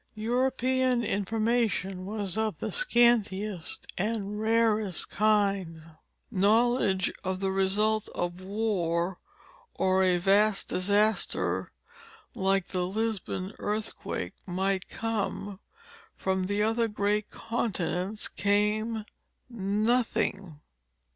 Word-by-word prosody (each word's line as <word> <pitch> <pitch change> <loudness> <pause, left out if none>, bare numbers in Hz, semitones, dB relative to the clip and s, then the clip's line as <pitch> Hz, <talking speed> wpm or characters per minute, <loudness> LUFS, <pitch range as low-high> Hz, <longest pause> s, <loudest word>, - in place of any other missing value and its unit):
European 255 +2 +1
information 205 -3 0
was 205 -3 -3
of 220 -1 -1
the - - -4
scantiest 215 - +1
and 210 0 -2
rarest 220 -4 +1
kind; 195 -6 +1 0.4
knowledge 205 -1 +3
of 190 -1 -2
the 195 0 0
result 205 +3 +1
of 175 +1 -3
a - - -11
war 185 -4 -1 0.6
or 190 0 +3
a 180 -1 +3
vast 200 +3 +3
disaster, 205 +3 +1 0.6
like 195 -1 +1
the 180 -1 -1
Lisbon 205 -2 -2
earthquake, 210 +1 -3
might 190 +1 -1
come. 205 -3 -3 0.6
From 190 -1 -1
the 205 +2 0
other 225 +1 +2
great 210 0 0
continents 210 -3 -2
came 210 +2 0 0.5
nothing. 205 -5 0
205 Hz, 95 wpm, -28 LUFS, 190-220 Hz, 0.6 s, knowledge